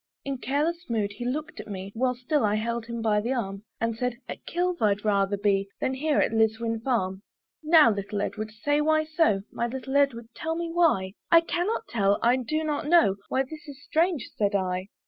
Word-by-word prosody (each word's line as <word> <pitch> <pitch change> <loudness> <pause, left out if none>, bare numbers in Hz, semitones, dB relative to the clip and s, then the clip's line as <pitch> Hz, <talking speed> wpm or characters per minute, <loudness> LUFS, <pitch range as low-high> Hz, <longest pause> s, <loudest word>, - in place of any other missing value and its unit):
In 275 -2 -3
careless 310 +5 -1
mood 215 -3 0
he 210 +4 -7
looked 295 +5 -3
at - - -7
me, 195 -1 -6
While 250 +2 0
still 255 +3 0
I 210 0 +2
held 230 +1 -2
him 235 -1 -4
by 210 -2 +2
the 240 +5 -1
arm, 195 -6 -3 0.2
And 230 0 -1
said, 250 +1 -2
"At - - -8
Kilve 355 +1 -1
I'd 210 -1 +1
rather 200 -1 +2
be 200 -1 +1
"Than 260 - 0
here 295 +3 0
at - - +3
Liswyn 225 +1 +1
farm." 195 -7 -1 0.4
"Now, 310 -6 +6
little 200 0 -3
Edward, 215 +1 -3
say 290 +8 0
why 310 +1 +3
so; 310 - +1
My 235 - -1
little 265 +2 -5
Edward, 245 -5 +2
tell 320 0 -3
me 340 0 -3
why;" 195 - +2 0.2
"I 335 -1 +7
cannot 365 +7 -2
tell, 200 - +2
I 240 +2 +4
do 310 +6 -2
not 295 -1 -2
know," 320 - +5
"Why 265 - +1
this 300 +3 -11
is 285 0 -11
strange," 330 -3 +1
said 200 -1 +1
I. 185 -1 -1
240 Hz, 205 wpm, -26 LUFS, 210-305 Hz, 0.4 s, I